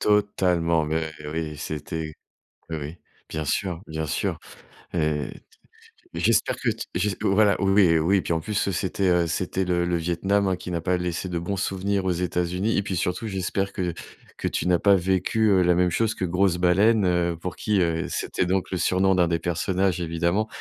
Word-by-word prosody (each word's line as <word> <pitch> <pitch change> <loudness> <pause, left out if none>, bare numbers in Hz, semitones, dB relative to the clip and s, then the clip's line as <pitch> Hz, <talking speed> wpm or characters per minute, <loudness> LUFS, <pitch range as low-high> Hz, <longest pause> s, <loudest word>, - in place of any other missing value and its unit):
Totalement! 90 -6 +2
Mais 80 +1 -1 0.2
oui, 75 0 -4
c'était 80 +1 -5 0.6
Oui, 80 - -2
oui. 75 +4 -6 0.3
Bien 80 -1 -3
sûr, 90 +3 -2
bien 80 0 -4
sûr. - - -2 0.6
Et 90 - 0 0.3
t - - -11 0.8
j'espère 110 +6 +2
que - - 0
t - - -3
j'es 105 -2 0
voilà 100 0 +4
oui, 95 -4 +4
oui. 95 +5 +3
Puis 85 - -1
en 80 - 0
plus, 100 +3 -1
c'était, 95 +1 0
heu, 90 -1 +3
c'était 95 +3 -1
le 90 -1 +1
le 85 0 0
Vietnam, 90 +4 0
hein, 95 - +1
qui 90 - -8
n'a 85 - -1
pas 90 +1 +1
laissé 90 0 -3
de 90 -2 -2
bons 95 +4 -3
souvenirs 95 0 -1
aux 95 - +2
États-Unis, 90 +4 -1
et 100 - +1
puis 95 -2 -3
surtout, 90 +6 -2
j'espère 95 0 -2
que 90 -2 -2 0.4
que - - -2
tu - - -2
n'as 90 -1 +3
pas 100 -1 +5
vécu 95 +2 +2
la 90 0 +3
même 90 +1 +3
chose 110 +4 0
que 95 - -2
Grosse 90 +1 +2
baleine, 100 +4 +4
heu, 85 -1 +1
pour 90 -2 -5
qui 105 -3 +1
heu 85 -1 0
c'était - - -1
donc 95 0 -1
le 95 - -1
surnom 95 +2 +2
de 90 - +3
1 85 - +4
des 85 0 +1
personnages, 90 +2 0
évidemment 85 +5 0
90 Hz, 195 wpm, -25 LUFS, 85-95 Hz, 0.8 s, pas